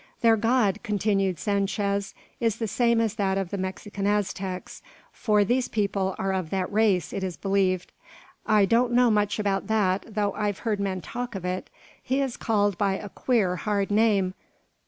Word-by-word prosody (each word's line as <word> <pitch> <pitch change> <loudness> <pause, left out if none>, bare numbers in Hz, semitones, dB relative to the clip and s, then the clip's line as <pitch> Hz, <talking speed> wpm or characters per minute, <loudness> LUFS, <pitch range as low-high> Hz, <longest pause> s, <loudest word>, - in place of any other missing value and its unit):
"Their 230 -1 +5
god," 220 -2 +2
continued 200 -4 0
Sanchez, 200 +2 -1 0.2
"is 230 -3 +1
the 225 -1 -3
same 235 +2 +2
as 225 -3 +1
that 195 -1 +1
of 195 -3 -3
the 200 - -2
Mexican 200 +1 -4
Aztecs; 195 -2 -2 0.3
for 210 -2 +2
these 245 +5 +1
people 200 -3 -1
are 195 0 -1
of 185 -4 -2
that 190 +1 -2
race, 205 -5 +2
it 195 - -3
is 185 -2 -3
believed. 190 -2 0 0.5
I 210 -2 +4
don't 240 +3 +2
know 245 -1 +5
much 210 -1 +1
about 200 -2 -1
that, 200 -3 +1
though 205 -1 +1
I've 205 -2 -1
heard 215 -3 0
men 190 -2 -2
talk 240 +4 -5
of 185 -2 -5
it. 180 +1 -3 0.3
He 265 +2 -1
is 270 -3 -1
called 205 -4 0
by 195 -2 +2
a 205 +1 -6
queer, 195 -6 0
hard 205 0 -1
name. 205 -3 +3
205 Hz, 180 wpm, -26 LUFS, 190-220 Hz, 0.5 s, Their